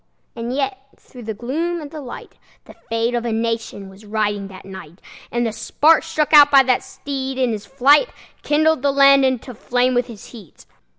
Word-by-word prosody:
And 235 +1 -5
yet, 270 -1 -2 0.2
through 250 - -15
the 220 -1 -6
gloom 325 +10 -3
and 295 -3 -9
the 310 -2 -8
light, 250 -3 -11 0.3
The - - -14
fate 230 +1 -3
of 240 -1 -1
a 235 - -2
nation 225 -3 -3
was 190 +2 -15
riding 205 -1 -2
that 190 -1 -13
night; 190 -3 -11 0.3
And 240 0 -1
the 225 - -1
spark 310 +7 +2
struck 315 -2 -2
out 290 -1 +9
by 275 -2 +6
that 255 -1 +1
steed, 270 -2 -6
in 255 -2 +1
his 215 -1 -6
flight, 280 - +3 0.3
Kindled 310 -1 +1
the 280 0 +1
land 275 0 +5
into 255 -1 -2
flame 245 +3 0
with 245 0 0
its 220 -4 -12
heat. 210 -9 -15
250 Hz, 195 wpm, -20 LUFS, 225-280 Hz, 0.3 s, out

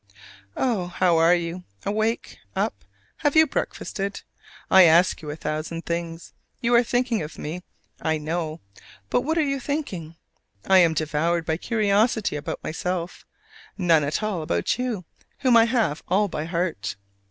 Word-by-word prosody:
Oh, 220 -9 0
how 175 -1 +2
are 165 +2 +6
you? 175 +1 -4 0.2
Awake? 220 +3 -1 0.2
Up? - - -2 0.3
Have 290 -1 0
you 315 0 +8
breakfasted? 200 -8 -4 0.5
I 190 - +9
ask 170 +3 +4
you 150 - -7
a 150 - -4
thousand 155 +2 -4
things. 170 -1 -4 0.3
You 240 -1 +1
are 235 - +7
thinking 245 -1 0
of 155 0 -7
me, 165 +4 -5 0.4
I 160 0 +1
know: 155 +1 -3 0.5
but - - +3
what 320 +5 -1
are 315 - +3
you 275 -1 -1
thinking? 220 - -4 0.5
I 190 -1 +6
am 165 -3 +4
devoured 160 +2 0
by 160 0 0
curiosity 215 0 +1
about 145 - -5
myself 180 +2 -4 0.5
none 170 -5 +4
at 145 +9 -1
all 205 -6 -1
about 85 - -1
you, 235 -8 -2 0.4
whom 255 -3 +4
I 230 -1 +7
have 230 - 0
all 200 +3 +2
by 155 -4 -4
heart! 170 - -2
180 Hz, 155 wpm, -24 LUFS, 160-225 Hz, 0.5 s, I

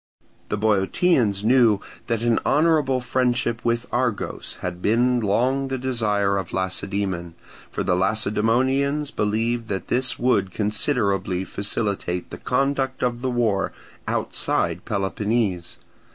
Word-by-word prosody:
The 105 - -1
Boeotians 105 - +2
knew 115 -3 +5 0.3
that 115 -1 -1
an 120 -1 +3
honourable 150 -4 +3
friendship 125 -2 0
with 115 0 0
Argos 120 -4 -2
had 90 0 -4
been 120 +4 +3
long 125 +6 +1
the 135 0 -2
desire 105 -6 0
of 95 -2 -4
Lacedaemon; 95 -2 -2 0.3
for - - -3
the 90 - +2
Lacedaemonians 120 +9 +1
believed 115 +2 0
that 95 -2 -4
this 125 0 0
would 110 -6 +2
considerably 100 -3 0
facilitate 100 -3 -3
the - - -7
conduct 135 -1 0
of 120 -1 0
the 130 - -1
war 115 -6 0 0.3
outside 85 +1 -1
Peloponnese. 100 -3 -1
110 Hz, 120 wpm, -23 LUFS, 100-125 Hz, 0.3 s, knew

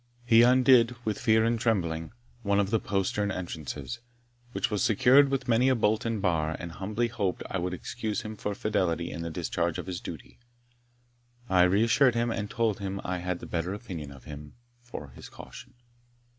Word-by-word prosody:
He 115 -1 +6
undid, 125 -1 +5
with 105 -2 -1
fear 110 0 +3
and 115 0 +1
trembling, 85 -8 -1 0.3
one 100 -2 +1
of 100 0 0
the 115 - +3
postern 100 +1 -1
entrances, 75 -8 -5 0.5
which - - -1
was 105 - 0
secured 130 +6 +5
with 135 -2 -2
many 125 +2 +4
a 130 - +3
bolt 110 -1 +1
and 115 -2 -1
bar, 80 -5 0
and 90 -2 -7
humbly 105 +7 -2
hoped 105 -6 -2
that - - -10
I 95 - 0
would 90 +1 -2
excuse 110 +5 -4
him 110 0 -6
for 105 -1 -4
fidelity 90 -6 -1
in 85 - -6
the 85 - -4
discharge 85 0 -2
of - - -5
his 90 -2 -5
duty. - - -9 1.1
I 90 -1 +4
reassured 115 +7 +4
him, 120 0 +1
and 105 -2 -3
told 115 -4 0
him 100 0 -4
I 90 0 -2
had 90 0 -3
the - - -7
better 85 +3 -2
opinion 90 - -7
of 70 -2 -13
him 75 0 -10 0.3
for 120 - -9
his 65 - -12
caution. - - -12
100 Hz, 190 wpm, -28 LUFS, 85-115 Hz, 1.1 s, He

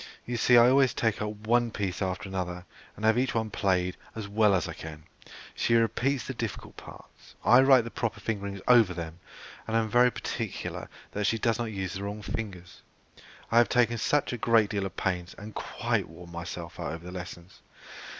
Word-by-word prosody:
You 120 - -3
see 120 +1 +5
I 120 0 +8
always 135 0 +4
take 110 -2 0
up 105 - -1 0.2
one 120 +1 +3
piece 100 -5 -3
after 95 +1 -2
another, 90 -2 -4 0.3
and 105 - -4
have 110 +2 +4
each 130 0 0
one 110 -1 -1
played 90 -3 0 0.2
as 110 -3 -5
well 105 0 +3
as 90 - 0
I - - -5
can; 80 -1 -9 0.5
she 115 - +1
repeats 120 +3 +1
the - - -4
difficult - - -5
parts, - - -14
I 125 +2 +7
write 135 -2 +6
the 115 - -7
proper 115 -2 -3
fingering 100 -2 -3
over 115 -7 +6
them, 85 0 -6 0.5
and 110 0 +1
am 110 -1 0
very 125 +1 +6
particular - - -5 0.2
that 105 0 -2
she 115 - +2
does 115 +1 +1
not 120 - 0
use 95 -4 -4
the 95 - -5
wrong 105 +1 -5
fingers. 95 -7 -6 0.7
I 115 - +6
have 120 -4 +4
taken 120 -1 +2 0.3
a 125 - -3
great 115 -2 +3
deal 100 -2 -1
of 95 - -13
pains, 90 -2 -2
and 105 +1 -9
quite - - -2
worn 85 +1 -12
myself 85 0 -7
out 70 - -3
over 85 +1 -8
the 90 - -7
lessons. 90 0 -9
105 Hz, 200 wpm, -28 LUFS, 90-115 Hz, 0.7 s, I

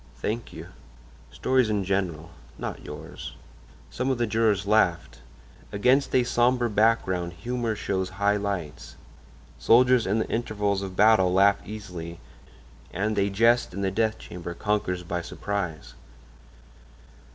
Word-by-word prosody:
"Thank 110 - -3
you." 80 +2 -9 0.6
"Stories 130 -3 +1
in 105 -2 0
general—not 85 -8 -4
yours." - - -9 0.6
Some 130 - -2
of 130 - +1
the 120 - +1
jurors 110 -3 +1
laughed. 85 - +1 0.5
Against 125 +7 +2
a 125 - +5
sombre 120 0 +2
background 95 -5 +1
humor 120 +3 -3
shows 95 -3 -2
high 100 0 +2
lights. 100 -7 -5 0.6
Soldiers 125 -1 +4
in 100 +3 +1
the 110 - -1
intervals 105 -4 -1
of 95 -1 -6
battle 105 -3 +5
laugh 100 +2 +4
easily, 90 -6 -8 0.7
and 105 +4 -1
a 100 0 +2
jest 115 0 +2
in 100 - -3
the 95 -1 0
death 110 +2 0
chamber 85 -1 -8
conquers 100 -4 -1
by 85 0 -3
surprise. 85 - -4
100 Hz, 130 wpm, -26 LUFS, 90-115 Hz, 0.7 s, a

